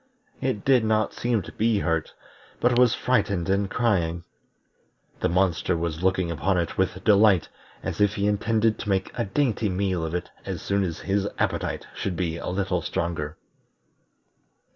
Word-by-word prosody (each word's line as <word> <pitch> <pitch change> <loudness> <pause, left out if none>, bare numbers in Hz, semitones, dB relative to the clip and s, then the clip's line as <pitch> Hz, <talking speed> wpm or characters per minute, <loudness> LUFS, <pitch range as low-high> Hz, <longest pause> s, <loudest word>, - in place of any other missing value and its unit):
It 125 -6 -2
did 130 -4 +5
not 110 0 +1
seem 120 -4 0
to - - -9
be 110 -1 +1
hurt, 80 -5 -1 0.4
but 120 0 +3
was 125 -2 +5
frightened 100 -8 +1
and 100 0 +1
crying. 85 -9 0 1.0
The - - +1
monster 90 -1 +1
was 80 -1 -3
looking 95 -2 +1
upon 90 +4 0
it 85 -1 -1
with 95 0 -1
delight, 100 -4 +5 0.3
as - - -3
if 105 0 +3
he 100 - 0
intended 110 +2 +1
to - - -5
make 95 -1 0
a - - -2
dainty 110 -1 0
meal 95 -2 -1
of 80 +1 -3
it 90 - -4
as - - -5
soon 100 0 +1
as 85 -4 -4
his 100 0 0
appetite - - -1
should 95 - -3
be 85 -2 -2
a - - -4
little 95 -1 -1
stronger. 80 -2 -3
95 Hz, 165 wpm, -25 LUFS, 85-110 Hz, 1.0 s, did